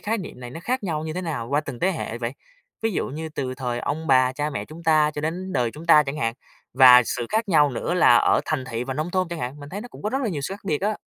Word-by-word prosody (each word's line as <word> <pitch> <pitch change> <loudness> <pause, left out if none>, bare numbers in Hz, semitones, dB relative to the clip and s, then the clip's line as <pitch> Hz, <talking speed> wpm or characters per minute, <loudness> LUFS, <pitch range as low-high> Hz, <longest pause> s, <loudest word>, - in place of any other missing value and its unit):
khái 220 +1 -1
niệm 175 -8 -8
này 120 -1 -8
nó 165 - -8
khác 250 +8 -2
nhau 155 -4 -2
như 155 - -4
thế 180 - -3
nào 150 -10 -4
qua 145 +1 +2
từng 140 -5 -8
tế 185 - +2
hệ 120 -8 -5
vậy? 120 0 -3 0.5
Ví 225 -1 0
dụ - - -1
như 160 +4 -5
từ 130 -4 -4
thời 125 -2 -3
ông 160 +6 -3
bà 130 -1 +4
cha 145 +3 -2
mẹ 140 - -4
chúng 160 +2 -12
ta 155 -2 +4
cho 150 - -3
đến 180 +5 -3
đời 125 -5 +1
chúng 155 +7 -11
ta 155 -2 +7
chẳng 140 0 -5
hạn, 115 -6 -1 0.4
và 125 -1 +9
sự 120 +1 -3
khác 220 0 -1
nhau 150 -5 +4
nữa 135 +7 -2
là 175 -8 +6
ở - - +3
thành 150 -4 -2
thị 120 -1 -4
và 135 +1 -4
nông 155 +5 -3
thôn 185 -1 0
chẳng 170 0 -5
hạn, 135 +1 -5
mình 145 - -9
thấy 200 +6 -6
nó 245 - -9
cũng - - -13
có 210 - -1
rất 265 - 0
là 235 - 0
nhiều 160 -8 -3
sự 190 - -3
khác 200 - -15
biệt 155 -5 -1
á. 210 +2 0
150 Hz, 315 wpm, -24 LUFS, 130-175 Hz, 0.5 s, và